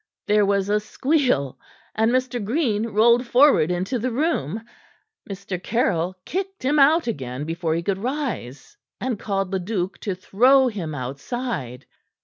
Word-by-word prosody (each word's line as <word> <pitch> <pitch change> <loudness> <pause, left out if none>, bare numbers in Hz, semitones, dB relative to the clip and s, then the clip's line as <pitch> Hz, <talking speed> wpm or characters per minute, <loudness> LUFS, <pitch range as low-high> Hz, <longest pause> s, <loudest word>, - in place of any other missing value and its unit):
There 210 -1 +3
was 200 -1 +1
a 210 +1 +2
squeal, 220 - 0 0.3
and 220 +1 +2
Mr. 250 -2 0
Green 225 -2 0
rolled 235 +3 +3
forward 255 - +5
into 185 +8 -1
the 250 +3 -1
room. 225 - -1 0.7
Mr. 195 -2 -5
Caryll 185 -6 0
kicked 385 -3 -4
him 295 +3 +3
out 310 +4 +5
again 135 - -4
before 165 0 -2
he 170 - -2
could 190 +1 -1
rise, 250 - -4 0.2
and 245 -5 -2
called 195 -2 -2
Leduc 190 0 -2
to 195 -3 -3
throw 255 +8 +4
him 170 -9 -5
outside. 140 - -5
210 Hz, 140 wpm, -23 LUFS, 180-255 Hz, 0.7 s, forward